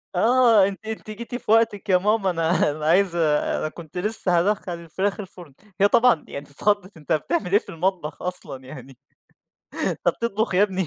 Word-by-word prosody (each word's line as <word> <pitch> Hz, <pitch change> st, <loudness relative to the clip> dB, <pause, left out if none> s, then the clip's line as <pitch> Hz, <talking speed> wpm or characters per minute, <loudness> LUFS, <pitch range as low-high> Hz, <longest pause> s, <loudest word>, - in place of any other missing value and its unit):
آه، 225 Hz, 0 st, +5 dB
"أنتِ 200 Hz, +2 st, -7 dB
أنتِ 220 Hz, 0 st, -6 dB
جيتِ 235 Hz, +3 st, -7 dB
في 245 Hz, -, -3 dB
وقتِك 220 Hz, -2 st, +2 dB
يا 185 Hz, -, +6 dB
ماما، 205 Hz, +1 st, +1 dB
أنا 165 Hz, -2 st, +1 dB
أنا 150 Hz, +1 st, -6 dB
عايز 175 Hz, +2 st, +3 dB
أنا 155 Hz, -1 st, 0 dB
كنت 165 Hz, +1 st, -11 dB
لسه 180 Hz, -2 st, +1 dB
هادَخّل 200 Hz, +1 st, -1 dB
الفراخ 190 Hz, +4 st, -3 dB
الفرن." 180 Hz, -6 st, -10 dB, 0.3 s
هي 200 Hz, -, +7 dB
طبعًا 230 Hz, -6 st, +3 dB
يعني 140 Hz, +1 st, -7 dB
ت -, -, -21 dB
اتخَضّت، 205 Hz, +4 st, -1 dB
"أنت 155 Hz, +1 st, -2 dB
بتعمل 180 Hz, +4 st, -1 dB
إيه 205 Hz, -, +5 dB
في -, -, -17 dB
المطبخ 165 Hz, -3 st, -3 dB
أصلًا 180 Hz, -7 st, -5 dB
يعني! 135 Hz, 0 st, -11 dB, 0.9 s
أنت -, -, -1 dB
بتطبخ 220 Hz, -3 st, -1 dB
يا 190 Hz, -, +5 dB
ابني؟!" 190 Hz, -3 st, 0 dB
190 Hz, 180 wpm, -23 LUFS, 165-210 Hz, 0.9 s, هي